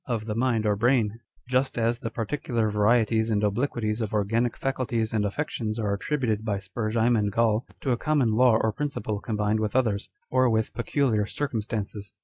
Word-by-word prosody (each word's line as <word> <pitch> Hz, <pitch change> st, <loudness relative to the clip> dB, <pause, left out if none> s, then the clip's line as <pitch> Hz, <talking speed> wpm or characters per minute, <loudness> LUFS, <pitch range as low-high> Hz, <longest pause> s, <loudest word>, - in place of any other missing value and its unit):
of 115 Hz, -4 st, -2 dB
the 110 Hz, -, -2 dB
mind 115 Hz, -1 st, +1 dB
or 105 Hz, -1 st, +2 dB
brain; 115 Hz, -1 st, +2 dB, 0.3 s
just 130 Hz, +1 st, 0 dB
as 115 Hz, +1 st, +1 dB
the 115 Hz, -, -4 dB
particular 115 Hz, -1 st, -1 dB
varieties 110 Hz, +1 st, +2 dB
and 105 Hz, -1 st, +1 dB
obliquities 110 Hz, 0 st, 0 dB
of 110 Hz, -1 st, -2 dB
organic 115 Hz, +4 st, +1 dB
faculties 120 Hz, -5 st, -1 dB
and 110 Hz, -2 st, +1 dB
affections 110 Hz, -1 st, -2 dB
are 105 Hz, -3 st, 0 dB
attributed 110 Hz, -2 st, -1 dB
by 105 Hz, -3 st, -1 dB
Spurzheim 110 Hz, +4 st, 0 dB
and 105 Hz, -2 st, +1 dB
Gall 115 Hz, +1 st, +1 dB
to 135 Hz, -, 0 dB
a 120 Hz, -, +2 dB
common 145 Hz, -5 st, +1 dB
law 120 Hz, 0 st, +5 dB
or 110 Hz, -, +1 dB
principle 110 Hz, -7 st, -3 dB
combined 105 Hz, 0 st, 0 dB
with 110 Hz, +1 st, -2 dB
others, 110 Hz, -6 st, +1 dB, 0.2 s
or 130 Hz, -1 st, +4 dB
with 110 Hz, -1 st, 0 dB
peculiar 115 Hz, -2 st, 0 dB
circumstances. 105 Hz, -6 st, -4 dB
110 Hz, 175 wpm, -26 LUFS, 105-120 Hz, 0.3 s, law